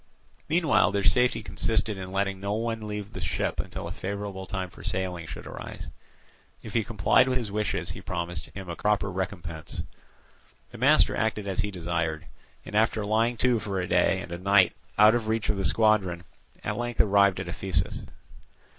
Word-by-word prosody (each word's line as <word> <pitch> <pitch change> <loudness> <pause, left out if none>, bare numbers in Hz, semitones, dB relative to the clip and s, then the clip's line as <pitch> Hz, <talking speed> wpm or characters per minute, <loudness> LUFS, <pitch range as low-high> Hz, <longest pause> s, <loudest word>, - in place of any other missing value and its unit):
Meanwhile 165 0 +4
their 100 -1 +1
safety 125 +2 +3
consisted 105 +3 0
in 95 -1 -7
letting 100 0 -1
no 100 +1 -2
one 115 0 -2
leave 105 -1 -5
the - - -6
ship - - -1
until - - -4
a - - -6
favourable 100 -1 -5
time 95 -3 -4
for - - -13
sailing 90 -3 -2
should - - -8
arise. - - -8 0.7
If 110 - -8
he 115 - +2
complied 115 +3 +3
with 130 - +1
his 115 -5 -3
wishes, 105 +1 -1
he - - -8
promised 85 -1 -4
him 95 -2 -9
a 85 - -4
proper 105 0 +1
recompense. 90 -4 -5 0.9
The - - -10
master - - +5
acted 110 -2 -1
as 95 +1 -2
he 105 -1 +1
desired, 85 -4 -2 0.4
and, - - -9
after 110 0 +2
lying 115 +3 +2
to 125 -2 +3
for 100 -2 -3
a 90 - -1
day 90 +2 +3
and 95 - -9
a 85 - -4
night 100 0 +5 0.2
out 105 +1 +8
of 120 -2 0
reach 110 -1 0
of 105 - +1
the 95 - -1
squadron, 100 -6 +2 0.4
at - - -2
length 120 -1 -3
arrived 100 -2 +4
at 95 - -4
Ephesus. 85 0 -1
100 Hz, 185 wpm, -27 LUFS, 95-110 Hz, 0.9 s, out